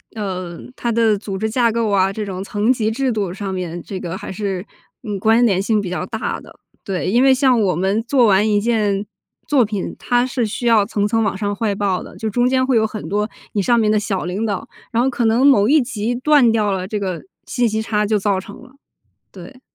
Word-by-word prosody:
呃， 185 -5 -5 0.2
它 235 - -2
的 225 -2 +3
组 195 -1 -5
织 220 +1 -1
架 235 0 +2
构 230 -1 0
啊， 195 -1 +2
这 215 +1 -4
种 190 -2 -5
层 205 +4 0
级 220 -4 0
制 255 +2 0
度 200 -5 -2
上 195 0 -5
面 175 -2 -4
这 190 -2 -6
个 175 -1 -5
还 - - -7
是 190 -2 -3 0.4
嗯 210 -4 -3
关 225 +4 +4
联 195 -5 +2
性 215 +1 +1
比 190 - -5
较 180 0 -3
大 220 +3 -3
的。 - - -15 0.3
对， 185 -2 -2
因 240 +6 +3
为 270 - +6
像 260 -2 +3
我 195 -5 +1
们 190 +5 0
做 250 -1 +3
完 205 +1 +4
一 205 -1 +2
件 210 -3 0 0.4
作 270 -5 +3
品， 205 -2 -4
它 245 0 +1
是 250 -2 -1
需 230 +3 -3
要 220 -3 +5
层 205 -1 -1
层 225 +1 +1
往 200 -2 0
上 205 0 -2
汇 210 -1 -1
报 195 -2 -1
的， - - -12
就 220 - -3
中 245 +3 +1
间 260 0 +2
会 255 -2 +2
有 220 - +3
很 215 -1 -6
多 210 +1 0 0.3
你 205 - +1
上 235 +4 +3
面 215 -1 +2
的 215 - +3
小 195 -2 -2
领 190 +5 -2
导， 200 -4 -3 0.2
然 235 0 +2
后 265 - +2
可 240 -2 -1
能 230 +4 +3
某 215 -8 +5
一 300 +4 +5
级 235 -2 -2
断 255 -1 +4
掉 215 -2 +1
了， 185 -1 -2
这 210 0 -3
个 185 -3 -4 0.2
信 245 -2 +1
息 220 0 -1
差 210 -1 0
就 210 0 +1
造 200 -1 0
成 200 +4 -11
了， 260 +1 -16 0.6
对。 190 +7 -12
215 Hz, 260 characters per minute, -19 LUFS, 195-235 Hz, 0.6 s, 为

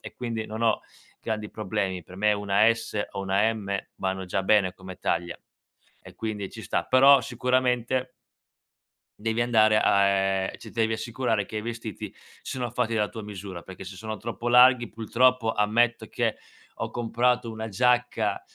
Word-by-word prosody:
e - - -10
quindi 115 -3 -4
non 110 +2 -5
ho 110 -2 +2 0.4
grandi 110 -2 -4
problemi. 100 -3 -3
Per 95 - -13
me 105 +2 +3
una 105 +2 +3
S 110 -2 -4
o 100 - -5
una 100 +3 +2
M 100 -2 -3 0.2
vanno 95 0 -2
già 95 +2 -1
bene 95 -2 +3
come 95 -1 -10
taglia, 85 -1 -1 0.7
e - - -13
quindi 105 -3 -4
ci - - -9
sta. - - -1
Però 135 +1 +6
sicuramente 125 +1 0 1.1
devi 115 +2 -1
andare 110 -2 +4
a 100 - +4
ehm, 95 -1 +1
ci 115 - -11
t - - -20
devi 110 -1 +1
assicurare 115 -1 -1
che 110 - -8
i 105 - -1
vestiti 115 -2 -6 0.3
siano 125 -2 -4
fatti 120 -1 -1
della 105 -2 +1
tua 110 - -8
misura, 100 -3 -8
perché 95 0 -10
se 95 0 -9
sono 110 +1 -5
troppo 115 +2 -5
larghi 125 -1 +6
purtroppo 115 +2 +2
ammetto 115 +3 +1
che - - -1 0.4
ho - - -4
comprato 120 0 0
una 110 0 -5
giacca, 125 +4 +1
110 Hz, 170 wpm, -26 LUFS, 100-120 Hz, 1.1 s, Però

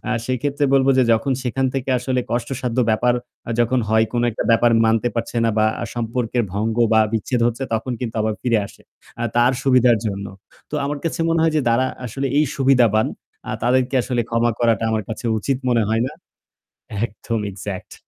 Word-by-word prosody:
আ - - +2
সেক্ষেত্রে 140 +3 -1
বলব 135 -1 +4
যে - - +6
যখন 130 +4 +1
সেখান 130 +1 0
থেকে 135 0 -2
আসলে 125 +1 -1
কষ্টসাধ্য 120 +1 -2
ব্যাপার 120 +3 +2 0.3
আ - - -3
যখন 125 +2 +2
হয়, 110 0 +4
কোন 120 -1 0
একটা 105 - -3
ব্যাপার 115 +1 +4
মানতে 115 +1 +2
পারছে 115 +1 -3
না 115 - +3
বা 110 - +4 0.3
সম্পর্কের 120 0 -1
ভঙ্গ 110 +3 -1 0.2
বা 110 - +6
বিচ্ছেদ 115 +2 -1
হচ্ছে 120 +2 -2
তখন 125 +3 -2
কিন্তু 120 -3 -4
আবার 110 0 0
ফিরে 115 -3 +2
আসে, - - -17 0.4
আ 120 - 0
তার 120 +2 +4
সুবিধার 125 -3 +4
জন্য। 100 -1 -3 0.4
তো - - -5
আমার 145 +1 -2
কাছে 165 - -2
মনে 165 0 +2
হয় 165 - +2
যে - - +3
তারা 120 +3 +2 0.2
আসলে 135 +5 -3
এই 155 - +4
সুবিধাবান। 125 -5 +3 0.6
তাদেরকে 125 +2 +1
আসলে 120 -1 -1
ক্ষমা 115 0 +2
করাটা 115 -1 +2
আমার 110 -1 0
কাছে 110 +2 -6
উচিত 130 +5 -1
মনে 120 -2 +3
হয় 110 +1 +1
না - - -6 0.9
একদম, 110 +2 -4
Exact। 95 0 -7
120 Hz, 185 wpm, -21 LUFS, 110-130 Hz, 0.9 s, যে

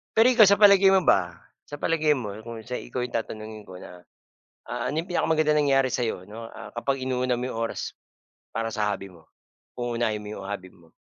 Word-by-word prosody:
Pero 225 +2 +6
ikaw, 225 -3 +8
sa 200 - +6
palagay 200 -2 +7
mo 190 - +3
ba, 90 -2 +3 0.3
sa 145 - -8
palagay 155 -2 +2
mo, 105 -6 -5
kung 115 -1 -7
sa 125 - -3
ikaw 125 +1 -5
'yung 125 - -5
tatanungin 110 -1 -5
ko 90 - -10
na, 90 -1 -12 0.7
ah, - - -2
ano 150 - -3
'yung 170 - -12
pinakamagandang 155 -3 +2
nangyari 135 -1 +3
sa'yo, 115 -8 -2
'no, 115 +2 -8 0.3
kapag 135 +2 -1
inuuna 125 -1 0
mo 125 - -2
'yung - - -7
oras 115 - -3 0.6
para 115 0 -1
sa 105 -1 +1
hobby 100 -1 -5
mo, 80 -2 -18 0.6
uunahin 120 -3 -1
mo - - -9
'yung 100 - -7
hobby 100 -2 -5
mo? 85 -2 -22
120 Hz, 200 wpm, -26 LUFS, 105-145 Hz, 0.7 s, ikaw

